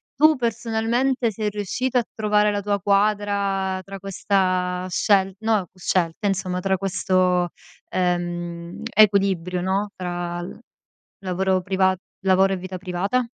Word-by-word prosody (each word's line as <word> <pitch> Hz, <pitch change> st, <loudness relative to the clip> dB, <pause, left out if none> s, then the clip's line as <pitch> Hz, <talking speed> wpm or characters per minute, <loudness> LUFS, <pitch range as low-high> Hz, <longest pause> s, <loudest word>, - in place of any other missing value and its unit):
tu, 310 Hz, +3 st, +5 dB
personalmente, 235 Hz, +1 st, 0 dB
sei 210 Hz, +1 st, -2 dB
riuscito 210 Hz, +5 st, -2 dB
a 245 Hz, -, +3 dB
trovare 210 Hz, -1 st, +2 dB
la 205 Hz, 0 st, -1 dB
tua 205 Hz, 0 st, 0 dB
quadra 200 Hz, -1 st, +1 dB
tra 195 Hz, +1 st, -8 dB
questa 185 Hz, -2 st, 0 dB
scel 190 Hz, +1 st, +2 dB
no, 215 Hz, -4 st, +1 dB
scelta, 185 Hz, +1 st, -1 dB
insomma, 185 Hz, -2 st, -1 dB
tra 190 Hz, +1 st, 0 dB
questo, 185 Hz, -2 st, +1 dB, 0.4 s
ehm, 175 Hz, -1 st, -2 dB
equilibrio, 195 Hz, -4 st, +3 dB
no, 195 Hz, +3 st, 0 dB
tra 175 Hz, -1 st, -4 dB
l 175 Hz, -, -8 dB, 0.6 s
lavoro 190 Hz, 0 st, 0 dB
privat 190 Hz, 0 st, +1 dB, 0.3 s
lavoro 190 Hz, 0 st, +4 dB
e 190 Hz, -, 0 dB
vita 185 Hz, 0 st, -6 dB
privata? 190 Hz, +7 st, -1 dB
190 Hz, 125 wpm, -23 LUFS, 180-210 Hz, 0.6 s, tu